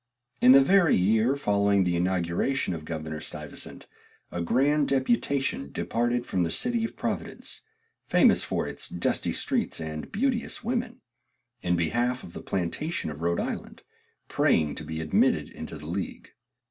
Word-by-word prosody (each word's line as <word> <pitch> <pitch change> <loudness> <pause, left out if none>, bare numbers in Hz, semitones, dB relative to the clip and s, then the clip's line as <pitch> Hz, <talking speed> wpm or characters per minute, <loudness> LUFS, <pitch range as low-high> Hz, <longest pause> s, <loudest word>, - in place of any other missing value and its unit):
In 125 - +8
the 135 - +9
very 175 +3 +5
year 110 +7 +3
following 100 -6 +2
the 90 -1 +1
inauguration 90 +6 0
of 80 -2 -6
Governor 80 -1 -5
Stuyvesant, - - -7 0.5
a 90 - -3
grand 140 - +2
deputation 135 - 0
departed 120 +1 -1
from 95 - -1
the 85 - +1
city 235 - 0
of 225 - -3
Providence - - -4 0.5
(famous - - +5
for - - -2
its - - -5
dusty - - 0
streets 245 - -1
and 80 -1 -5
beauteous 245 +1 -1
women) 245 +1 -2 0.6
in 90 0 +1
behalf 120 +10 0
of 85 - -11
the - - -7
plantation 95 - -2
of 75 +1 -9
Rhode 85 +1 +1
Island, - - -5 0.4
praying 75 -2 +2
to - - -5
be 80 0 -5
admitted 80 -1 +2
into 80 0 -8
the 75 - -11
league. 90 +5 -5
100 Hz, 150 wpm, -27 LUFS, 85-140 Hz, 0.6 s, the